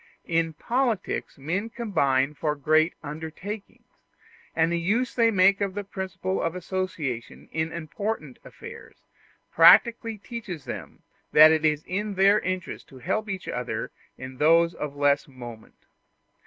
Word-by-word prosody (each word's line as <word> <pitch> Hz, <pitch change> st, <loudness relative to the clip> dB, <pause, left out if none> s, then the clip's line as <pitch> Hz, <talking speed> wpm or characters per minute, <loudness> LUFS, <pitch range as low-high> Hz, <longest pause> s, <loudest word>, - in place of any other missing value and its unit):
In 165 Hz, -1 st, 0 dB
politics 235 Hz, -, -1 dB
men 175 Hz, +11 st, -2 dB
combine 150 Hz, -, +1 dB
for 150 Hz, 0 st, -2 dB
great 155 Hz, +3 st, +2 dB
undertakings; 160 Hz, +8 st, -7 dB, 0.7 s
and 165 Hz, +1 st, +2 dB
the 170 Hz, -, 0 dB
use 225 Hz, +9 st, 0 dB
they 230 Hz, -2 st, +4 dB
make 195 Hz, -1 st, +4 dB
of 195 Hz, -1 st, -1 dB
the 205 Hz, -, -3 dB
principle 190 Hz, -1 st, -4 dB
of 165 Hz, +1 st, -2 dB
association 180 Hz, -9 st, -4 dB
in 160 Hz, +1 st, -2 dB
important 165 Hz, -, -5 dB
affairs -, -, -11 dB, 0.6 s
practically 225 Hz, +6 st, +6 dB
teaches 205 Hz, -, -7 dB
them -, -, -8 dB, 0.3 s
that 155 Hz, +1 st, +9 dB
it 160 Hz, -1 st, +1 dB
is 155 Hz, -1 st, +2 dB, 0.3 s
their 200 Hz, +2 st, +5 dB
interest 185 Hz, -3 st, -4 dB
to 135 Hz, -, -14 dB
help 195 Hz, -, -2 dB
each 190 Hz, -1 st, -5 dB
other 125 Hz, 0 st, -3 dB, 0.3 s
in 130 Hz, 0 st, -9 dB
those 165 Hz, +3 st, +4 dB
of 145 Hz, -3 st, -5 dB
less 145 Hz, +1 st, +2 dB
moment. 120 Hz, -4 st, -12 dB
165 Hz, 135 wpm, -26 LUFS, 150-200 Hz, 0.7 s, that